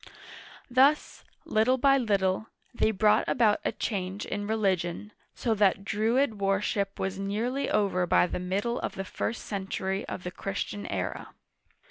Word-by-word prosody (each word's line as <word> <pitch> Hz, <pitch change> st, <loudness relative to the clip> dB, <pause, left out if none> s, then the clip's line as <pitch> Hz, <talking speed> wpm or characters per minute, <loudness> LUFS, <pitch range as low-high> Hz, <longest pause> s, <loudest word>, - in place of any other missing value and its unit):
Thus, 270 Hz, +4 st, +3 dB, 0.2 s
little 225 Hz, +4 st, +2 dB
by 275 Hz, +1 st, +4 dB
little, 200 Hz, -3 st, +1 dB, 0.3 s
they 235 Hz, -, +2 dB
brought 210 Hz, 0 st, +3 dB
about 220 Hz, -4 st, +3 dB
a -, -, 0 dB
change 195 Hz, -2 st, -3 dB
in 205 Hz, 0 st, -4 dB
religion, 195 Hz, -2 st, -1 dB, 0.2 s
so 230 Hz, -, 0 dB
that 200 Hz, -2 st, +2 dB
Druid 220 Hz, +2 st, +1 dB
worship 195 Hz, 0 st, 0 dB
was 190 Hz, 0 st, -2 dB
nearly 225 Hz, +7 st, -1 dB
over 190 Hz, -4 st, +1 dB
by -, -, +4 dB
the 180 Hz, -, -3 dB
middle 200 Hz, +7 st, -1 dB
of -, -, -4 dB
the 195 Hz, -, -4 dB
first 230 Hz, +4 st, -4 dB
century 195 Hz, 0 st, -3 dB
of 180 Hz, -, -6 dB
the 180 Hz, -, -4 dB
Christian 200 Hz, +2 st, -4 dB
era. -, -, -4 dB
205 Hz, 145 wpm, -28 LUFS, 190-225 Hz, 0.3 s, by